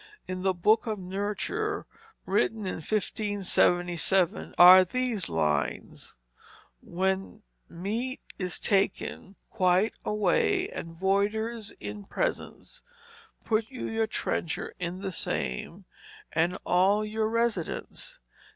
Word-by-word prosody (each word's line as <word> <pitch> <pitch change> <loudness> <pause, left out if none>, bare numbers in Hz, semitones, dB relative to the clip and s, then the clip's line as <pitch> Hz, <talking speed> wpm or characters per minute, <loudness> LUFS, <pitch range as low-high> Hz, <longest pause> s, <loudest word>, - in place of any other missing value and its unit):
In 185 0 -4
the 190 0 +1
Boke 215 +7 +3
of 215 -1 -1
Nurture, 205 - -3 0.4
written 210 +2 0
in 185 - -3
1577, 190 -2 +1
are 185 +1 +10
these 235 - -1
lines: 75 -3 -2 0.7
"When 190 +4 -2 0.3
meate 225 +9 -3 0.2
is 180 -2 -3
taken 195 0 -1 0.2
quyte 185 +1 +2
awaye 210 -4 +1
And 165 0 -7
Voyders 210 +4 0
in 205 -1 -7
presence, - - -4 0.6
Put 220 -1 0
you 255 - -5
your 225 0 0
trenchour 170 -6 -2
in 180 +1 -4
the 195 - -2
same 170 - -3 0.5
and 170 +3 +1
all 195 +4 +3
your 215 0 -1
resydence. 235 - -2
195 Hz, 105 wpm, -28 LUFS, 180-220 Hz, 0.7 s, are